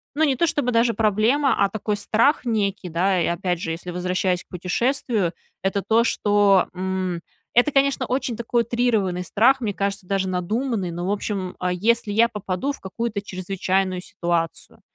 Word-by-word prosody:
ну, 315 - +2
не 270 -4 +2
то, 340 - +2
чтобы 285 -5 0
даже 230 0 +3
проблема, 225 +6 +2
а 200 - +5
такой 210 0 -2
страх 235 +7 +2
некий, 200 -5 -1
да, 180 +2 +1
и, - - +1
опять 175 0 -1
же, 165 - -3
если 175 +2 -5
возвращаясь 180 0 -1
к - - -59
путешествию- 200 +1 -1 0.3
это 195 +1 0
то, 230 +3 +3
что, 205 -4 +3
м 185 -1 -2 0.4
это, 245 +5 +5
конечно, 275 -1 +2
очень 260 -1 -1
такой 235 +1 0
утрированный 220 -7 0
страх, 250 +9 +3
мне 205 -4 -2
кажется, 195 -1 -2
даже 195 -1 0
надуманный, 195 +3 -1
но, 175 +1 -4
в 195 - 0
общем, 200 -3 -3
э, 180 - 0
если 215 +4 +1
я 225 +3 +4
попаду 210 +3 -3
в - - -9
какую-то 210 +2 -4
чрезвычайную 185 -1 -1
ситуацию, 170 -3 -3
200 Hz, 175 wpm, -23 LUFS, 185-235 Hz, 0.4 s, а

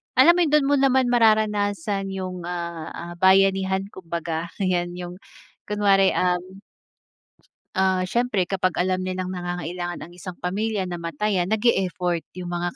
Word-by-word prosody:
alam 265 +7 +7
mo, - - +3
dun 295 -2 +3
mo - - +5
naman 265 -2 +3
mararanasan 210 -4 +2
yung, 185 -2 -5
ah, 170 -2 -5
ah, 170 +1 -7
bayanihan 190 0 +4
kumbaga, 170 -2 -4 0.2
'yan 175 -2 0
yung 180 0 -7 0.5
kunwari, 200 -2 +3
um 185 +2 -1 1.1
ah, 190 -1 +2
siyempre 225 0 0
kapag 185 -1 -1
alam 185 0 0
nilang 185 0 -3
nangangailangan 175 -1 -4
ang 170 - -11
isang 180 0 -9
pamilya, 205 +3 -1
namatayan, 175 +2 -2
nag-e-effort 190 -5 +1 0.2
yung 180 -1 -6
mga 175 0 -2
185 Hz, 130 wpm, -23 LUFS, 175-205 Hz, 1.1 s, alam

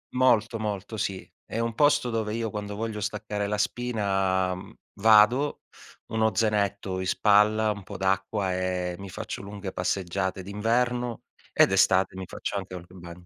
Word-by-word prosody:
molto, 115 -3 +3
molto, 105 0 -4
sì. 95 -2 -3 0.2
È 115 - -4
un 115 -1 -1
posto 145 -2 +3
dove 110 -2 -2
io, 115 -1 -2
quando 105 0 -5
voglio 110 -1 -3
staccare 105 0 -3
la 105 +1 -1
spina, 95 -5 0
mhmm, 90 - -10 0.3
vado, 110 +6 +5 0.5
uno 110 0 +2
zainetto 100 -3 0
in 95 - -3
spalla, 105 +3 +4
un 100 -1 -6
po' - - -8
d'acqua 95 0 0
e 90 -1 -2
mi 100 -1 -8
faccio 110 +4 -6
lunghe 100 -1 -7
passeggiate 95 +1 -2
d'inverno 120 +4 -1 0.3
e - - +6
d'estate 95 -1 +3
mi 95 - -5
faccio 100 - -5
anche 95 -1 -6
un 90 -1 -8
ba 85 -2 -10
105 Hz, 160 wpm, -27 LUFS, 95-110 Hz, 0.5 s, e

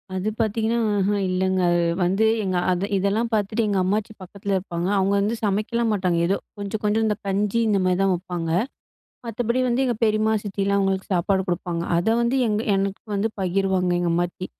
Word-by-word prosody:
அது 190 +3 -1
பாத்தீங்கன்னா 225 +1 0 0.2
அஹ்ம் 200 +1 +1
இல்லங்க. 185 0 0
அது 175 0 +2 0.2
வந்து 195 +5 +2 0.2
எங்க 185 -2 -1
அத 185 +2 0
இதெல்லாம் 200 +5 0
பாத்துட்டு 215 +2 0
எங்க 200 -2 0
அம்மாச்சி 210 +3 -1
பக்கத்துல 200 +2 -5
இருப்பாங்க. 175 -2 -3
அவங்க 195 +1 +2
வந்து 210 +3 0
சமைக்கலாம் 215 +3 0
மாட்டாங்க. 185 -4 0
ஏதோ 195 - +2 0.2
கொஞ்சம் 205 +1 -4
கொஞ்சம் 215 +2 +2
இந்த 210 -1 +1
கஞ்சி 205 +3 0
இந்த 205 -2 +2
மாரி 185 -1 +2
தான் 195 - +3
வப்பாங்க. 175 -2 -4 0.8
மத்தபடி 235 +2 -1
வந்து 245 +2 +1
எங்க 240 -3 0
பெரிமா, 215 0 +2
சித்திலாம் 200 -1 -1
அவங்களுக்கு 190 -1 -1
சாப்பாடு 190 +2 +1
கொடுப்பாங்க. 175 -1 -2
அத 175 - 0
வந்து 235 +3 +1
எங்க 210 0 0 0.2
எனக்கு 195 0 -2
வந்து 200 +3 +1
பகிருவாங்க 190 -1 +1
எங்க 175 -1 0
அம்மாச்சி. 175 +1 -2
195 Hz, 175 wpm, -23 LUFS, 185-215 Hz, 0.8 s, தான்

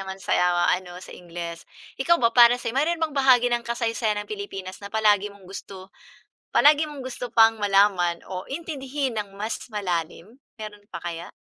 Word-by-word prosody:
naman 190 0 -6
sa - - -2 0.4
ano, 180 -1 -4
sa - - -11
Ingles. 170 -1 -8 0.4
Ikaw 340 +5 +4
ba, 230 -1 +3
para 240 0 +7
sa'yo, 230 - -3
mayroon 320 +2 0
bahagi 255 -3 +4
ng 240 - +1
kasaysayan 230 -3 -1
ang - - -23
Pilipinas 195 - -7
na 200 - -8
palagi 210 -2 +3
mong 200 -1 -18
gusto 190 0 -10 0.6
palagi 300 +1 +5
mong 290 -2 -8
gusto 250 -1 -6
pang 225 -1 +5
malaman 195 -4 +2
o 185 0 -6
intindihin 280 -3 -4
ng 200 -1 -6
mas 215 +3 -4
malalim, 190 - -4 0.2
meron 210 -1 -8
pa - - -6
kaya? 170 0 -5
215 Hz, 170 wpm, -24 LUFS, 190-260 Hz, 0.6 s, para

